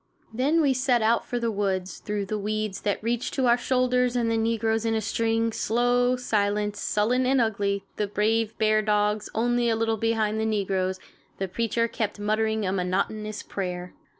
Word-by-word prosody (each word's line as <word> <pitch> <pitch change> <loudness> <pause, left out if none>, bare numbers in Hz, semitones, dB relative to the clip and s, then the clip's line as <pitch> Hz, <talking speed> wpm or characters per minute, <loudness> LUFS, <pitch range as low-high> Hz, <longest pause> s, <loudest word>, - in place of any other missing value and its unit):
Then 285 +8 +2
we 275 -2 +3
set 250 -2 +2
out 230 +1 +2
for 245 - -2
the 235 -1 -1
woods, 190 -3 -2
through 205 -1 -3
weeds 215 0 -3
that 205 0 -1
reached 235 +1 -1
to 265 - +1
our 240 -1 +5
shoulders, 250 0 +1
the 240 - +1
negroes 225 -1 +1
in 225 -1 0
a - - +1
string, 225 +1 0
slow, 245 +3 +2
silent, 210 -4 0
sullen 245 +5 +1
and 265 0 +3
ugly, 200 -3 0
the 210 - 0
brave 220 +2 0
bear 215 0 +3
dogs 210 0 +1
only 240 +1 +1
a 225 - +2
little 225 0 0
behind 220 -1 0
the - - 0
negroes. 190 -3 -1 0.4
The 195 - -2
preacher 230 +4 0
kept 220 -2 -3
muttering 215 +1 0
a 185 - 0
monotonous 195 +3 -2
prayer. 180 -2 -5
220 Hz, 175 wpm, -26 LUFS, 205-235 Hz, 0.4 s, our